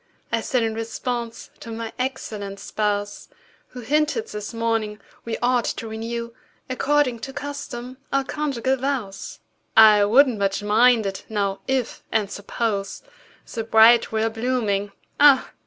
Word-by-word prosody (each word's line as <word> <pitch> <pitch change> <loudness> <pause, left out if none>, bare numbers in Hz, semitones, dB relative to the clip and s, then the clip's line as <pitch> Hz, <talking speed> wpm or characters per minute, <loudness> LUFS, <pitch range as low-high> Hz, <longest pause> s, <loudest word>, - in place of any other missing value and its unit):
I - - +1
said 250 -3 0
in 225 -1 -1
response 230 +1 -4
to - - -10
my 225 0 -5
excellent 215 -6 -4
spouse, 205 -1 -2 0.4
Who 250 - -10
hinted, 290 -1 +1
this 210 0 -6
morning, 225 -2 -1 0.3
we 230 -1 -3
ought 245 -1 +2
to 225 - -3
renew 230 +1 -5 0.4
According 265 -2 +1
to 270 - -6
custom, 260 -3 -6
our 275 0 +2
conjugal 265 -3 -1
vows. 245 - -4 0.4
"I 215 -2 +8
wouldn't 245 +1 +4
much 195 +1 0
mind 225 +2 +4
it, 195 0 -4
now—if—and 210 0 -2
suppose— 200 -1 -3 0.5
The 225 - -2
bride 225 +1 +6
were 220 0 +1
a 225 - 0
blooming—Ah! 230 +3 +1
230 Hz, 130 wpm, -23 LUFS, 210-255 Hz, 0.5 s, I